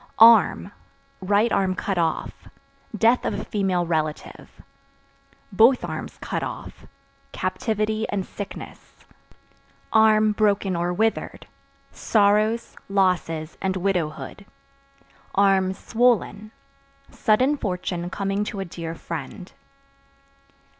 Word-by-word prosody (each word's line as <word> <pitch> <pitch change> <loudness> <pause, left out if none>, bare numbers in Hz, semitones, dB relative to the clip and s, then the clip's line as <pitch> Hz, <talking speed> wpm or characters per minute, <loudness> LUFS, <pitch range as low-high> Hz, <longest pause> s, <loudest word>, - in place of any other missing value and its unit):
Arm 230 +1 +6 0.5
(Right 205 +4 +2
arm 190 -2 +1
cut 195 -2 -2
off) 165 -1 -2 0.5
death 230 +4 +3
of - - -2
a - - -6
female 190 -4 0
relative; 155 -2 -3 1.0
(both 230 +6 +4
arms - - -6
cut - - -3
off) - - -8 0.5
captivity 215 -1 -2
and 195 -2 -2
sickness; 205 - -10 1.3
(broken 200 -3 +1
or 175 +1 -1
withered) 220 +5 -1 0.5
sorrows, 215 +2 +1
losses 175 -5 0
and 190 0 -1
widowhood; 185 +1 -3 1.3
(swollen) 220 -2 0 0.6
sudden 255 +5 +2
fortune 180 -5 -3
coming 195 +2 -2
to 205 - -5
a 195 - -3
dear 165 -1 -6
friend. 165 +3 -7
195 Hz, 90 wpm, -23 LUFS, 180-215 Hz, 1.3 s, Arm